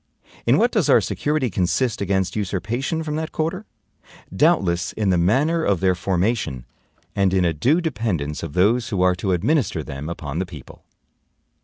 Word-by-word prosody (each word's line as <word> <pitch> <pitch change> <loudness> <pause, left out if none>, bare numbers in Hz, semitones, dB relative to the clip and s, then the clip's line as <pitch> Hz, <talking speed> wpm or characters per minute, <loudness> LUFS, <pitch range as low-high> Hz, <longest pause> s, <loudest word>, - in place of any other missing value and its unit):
In - - +5
what - - +3
does - - +1
our - - +7
security 145 -5 -1
consist 100 +7 0
against 95 -1 0
usurpation 110 - -2
from 150 -1 -3
that 160 0 -4
quarter? 170 +6 -3 0.7
Doubtless 85 -2 +2
in 105 -3 0
the 90 - +3
manner 145 - +2
of 100 - +1
their 95 0 +3
formation, 90 - -1 0.5
and 95 -1 +2
in 90 -1 +3
a 85 - +1
due 135 - +2
dependence 105 - -2
of 80 -4 -6
those 110 +7 +2
who 95 -3 0
are 90 0 +4
to 95 +1 -1
administer 115 - +1
them 70 +3 -6
upon 80 -2 -5
the 95 - -1
people. 75 -8 -12
95 Hz, 170 wpm, -22 LUFS, 90-130 Hz, 0.7 s, our